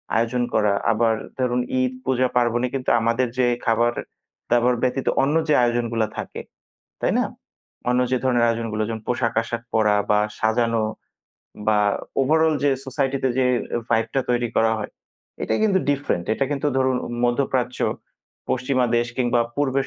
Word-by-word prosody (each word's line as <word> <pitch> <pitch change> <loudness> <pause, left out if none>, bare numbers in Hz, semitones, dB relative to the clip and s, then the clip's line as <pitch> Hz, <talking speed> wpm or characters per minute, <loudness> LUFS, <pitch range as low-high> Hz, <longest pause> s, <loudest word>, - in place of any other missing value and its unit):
আয়োজন 115 +2 +1
করা 105 -2 +3 0.2
আবার 115 0 +2 0.3
ধরুন 125 -1 +1 0.2
ঈদ 130 0 0
পূজা 130 -1 +2
পার্বণে 120 0 +2
কিন্তু 130 -1 -2
আমাদের 115 +3 +1
যে 130 - +3 0.2
খাবার-দাবার 120 +1 0
ব্যতীত 130 +1 0 0.2
অন্য 145 +3 +1
যে 150 - +3
আয়োজনগুলা 120 -2 0
থাকে, - - -5 0.6
তাই - - +1
না? - - +2 0.6
অন্য 125 0 +2
যে 130 - +3
ধরনের 120 -2 +3
আয়োজনগুলো 115 -2 -1
যেমন 110 -1 -4
পোশাক-আশাক 115 -1 -1
পরা 105 -2 +3 0.2
বা 105 - +4 0.2
সাজানো 115 0 +1 0.8
বা 110 -1 +3 0.4
ওভারঅল 160 +3 +3
যে 145 - +4 0.2
সোসাইটিতে 135 0 0
যে 130 - +3 0.4
ভাইবটা 115 +4 +1
তৈরি 120 -1 +1
করা 110 0 +3
হয় 105 - -6 0.5
এটাই - - 0
কিন্তু 200 -3 +3
ডিফারেন্ট, 140 -11 -1
এটা 135 - 0
কিন্তু 145 0 -1
ধরুন 130 -1 +2 0.3
মধ্যপ্রাচ্য, 125 0 0 0.7
পশ্চিমা 130 0 +1
দেশ 120 - 0
কিংবা 120 -1 +2 0.2
পূর্বের 135 -1 0
120 Hz, 140 wpm, -22 LUFS, 115-130 Hz, 0.8 s, বা